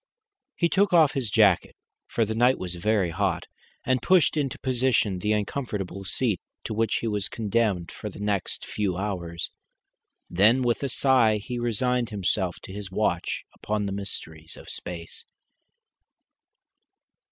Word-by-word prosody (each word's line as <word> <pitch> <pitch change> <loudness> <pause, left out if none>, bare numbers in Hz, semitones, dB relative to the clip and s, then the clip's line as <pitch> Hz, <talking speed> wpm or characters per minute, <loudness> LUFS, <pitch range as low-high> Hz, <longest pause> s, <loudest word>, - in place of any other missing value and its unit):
He 170 - +2
took 195 +3 +2
off 160 -4 +6
his 130 -5 -2
jacket, 100 -4 +4 0.3
for 115 - +1
the 110 - -2
night 120 +3 +4
was 90 -1 -5
very 95 0 +1
hot, 85 - 0 0.4
and 130 -1 +2
pushed 180 -5 +4
into 140 -4 -1
position 125 -7 +1
the 105 +4 0
uncomfortable 105 -3 -3
seat 105 - 0 0.2
to - - -4
which 110 0 +1
he 115 - -1
was 105 -2 -1
condemned 105 -5 0
for 105 - -6
the - - -12
next 105 -3 -2
four 95 -4 -2
hours. 85 -4 -3 0.8
Then 110 +8 +4
with 120 -1 +1
a 140 - -1
sigh 125 -5 +4
he 120 +4 -5
resigned 120 +1 0
himself 95 -3 0
to 95 - -9
his 100 -1 -6
watch 95 -3 -1
upon 105 -1 -2
the 100 - -2
mysteries 80 -5 -6
of - - -11
space. 85 -1 -7
105 Hz, 150 wpm, -26 LUFS, 95-125 Hz, 0.8 s, off